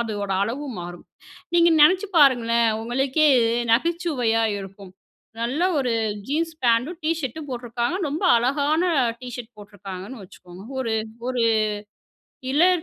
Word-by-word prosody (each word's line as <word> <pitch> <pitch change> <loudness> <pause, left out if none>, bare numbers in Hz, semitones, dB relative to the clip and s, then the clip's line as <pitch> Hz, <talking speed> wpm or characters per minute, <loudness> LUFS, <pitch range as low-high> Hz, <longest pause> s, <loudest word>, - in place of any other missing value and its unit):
அதோட 205 -4 -3
அளவும் 255 +1 -5
மாறும். 175 0 -9 0.5
நீங்க 340 0 +5
நெனச்சு 370 +6 +5
பாருங்களேன், 235 -4 +4
உங்களுக்கே 265 +6 +1 0.5
நகைச்சுவையா 255 -6 +1
இருக்கும். 195 -1 -11 0.5
நல்ல 260 +9 -1 0.2
ஒரு 255 -3 0 0.4
ஜீன்ஸ் 325 +3 -1
பேண்ட்டும், 240 +9 +2
டீ 315 - +1
ஷர்டும் 290 +2 -6
போட்ருக்காங்க, 240 +5 -3
ரொம்ப 315 +7 -3
அழகான 285 +7 +1 0.4
டீ 255 - -8
ஷர்ட் 240 -1 -10
போட்ருக்காங்கன்னு 200 +2 -9
வச்சுக்கோங்க. 180 +1 -14 0.2
ஒரு 230 -3 -1 0.3
ஒரு 250 -2 -1 1.1
இலர் 350 +3 +3
245 Hz, 115 wpm, -23 LUFS, 225-300 Hz, 1.1 s, நீங்க